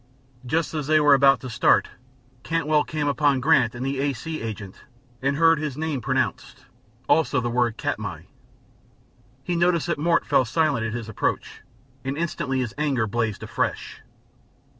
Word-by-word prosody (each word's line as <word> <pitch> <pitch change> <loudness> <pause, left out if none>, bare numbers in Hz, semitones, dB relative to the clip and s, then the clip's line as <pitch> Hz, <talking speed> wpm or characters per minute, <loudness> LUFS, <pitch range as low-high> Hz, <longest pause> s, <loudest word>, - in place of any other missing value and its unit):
Just 160 +5 0
as 150 -3 -3
they 155 0 +4
were 145 -1 +5
about 135 0 +5
to 130 - -7
start, 120 - +3 0.5
Cantwell 155 -1 +1
came 150 -2 -3
upon 145 -1 +2
Grant 130 -4 +3
and 125 +2 -4
the 135 0 -2
A. 140 0 0
C. 160 +6 -6
agent, 105 -4 -7 0.4
and 140 +1 0
heard 165 0 +4
his 150 -3 -4
name 155 -4 -2
pronounced, - - -2 0.4
also 155 -3 +3
the 120 -1 -2
word 120 -2 0
"Katmai." - - -4 1.2
He 175 - -2
noted 170 0 +2
that 170 -4 -2
Mort 170 +2 +2
fell - - +3
silent 135 -2 0
at 110 - -5
his 120 -2 -5
approach, 110 - -3 0.4
and 135 +2 -3
instantly 135 -5 -2
his 120 -4 -4
anger 140 -7 +1
blazed 110 -1 -2
afresh. - - -3
140 Hz, 160 wpm, -24 LUFS, 120-155 Hz, 1.2 s, were